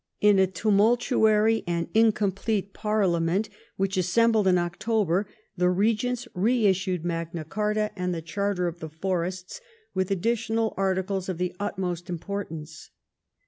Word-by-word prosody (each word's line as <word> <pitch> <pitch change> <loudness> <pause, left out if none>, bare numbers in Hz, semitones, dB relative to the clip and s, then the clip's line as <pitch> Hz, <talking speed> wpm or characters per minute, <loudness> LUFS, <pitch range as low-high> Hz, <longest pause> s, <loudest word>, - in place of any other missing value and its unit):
In 205 -2 +5
a 190 - +5
tumultuary 220 +2 +3
and 170 -1 -1
incomplete 210 -2 +1
parliament 195 -2 0 0.3
which 195 0 -1
assembled 215 +3 +3
in 180 -1 +5
October, 190 +2 0 0.3
the 180 -1 +2
regents 225 +6 0
reissued 190 -4 +1
Magna 165 -1 -3
Carta 210 +4 -1
and 180 -1 -2
the 165 -2 -4
Charter 190 +1 -1
of 170 0 -5
the 160 - -6
Forests, 180 - -3 0.3
with 190 -1 -1
additional 225 +3 0
articles 190 0 -1
of 185 - -3
the 180 0 -2
utmost 180 -4 -3
import 200 +3 -4
ance. 155 0 -9
190 Hz, 130 wpm, -26 LUFS, 175-215 Hz, 0.3 s, In